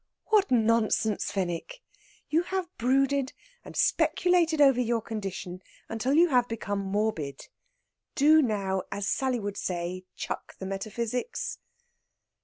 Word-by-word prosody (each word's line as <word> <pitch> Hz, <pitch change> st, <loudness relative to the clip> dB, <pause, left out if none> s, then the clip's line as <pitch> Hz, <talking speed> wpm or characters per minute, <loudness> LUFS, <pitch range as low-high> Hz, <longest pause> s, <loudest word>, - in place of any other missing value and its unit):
"What 420 Hz, -2 st, +4 dB
nonsense, 225 Hz, -2 st, +2 dB
Fenwick! 195 Hz, -, -3 dB, 0.4 s
You 320 Hz, +2 st, +2 dB
have 370 Hz, 0 st, -4 dB
brooded 270 Hz, +2 st, +2 dB, 0.3 s
and -, -, -11 dB
speculated 345 Hz, -3 st, +2 dB
over 270 Hz, -4 st, +6 dB
your 235 Hz, -1 st, +1 dB
condition 195 Hz, -5 st, -6 dB, 0.3 s
until 225 Hz, +4 st, -1 dB
you 340 Hz, +2 st, +6 dB
have 250 Hz, -3 st, +3 dB
become 205 Hz, -3 st, -3 dB
morbid. 195 Hz, -8 st, -2 dB, 0.7 s
Do 310 Hz, +2 st, +6 dB
now, 200 Hz, -6 st, 0 dB
as 200 Hz, 0 st, -3 dB
Sally 260 Hz, +1 st, 0 dB
would 205 Hz, -1 st, -4 dB
say, 180 Hz, +1 st, -3 dB
chuck -, -, -5 dB
the 190 Hz, -, -7 dB
metaphysics." 220 Hz, -, -3 dB
230 Hz, 120 wpm, -28 LUFS, 195-280 Hz, 0.7 s, over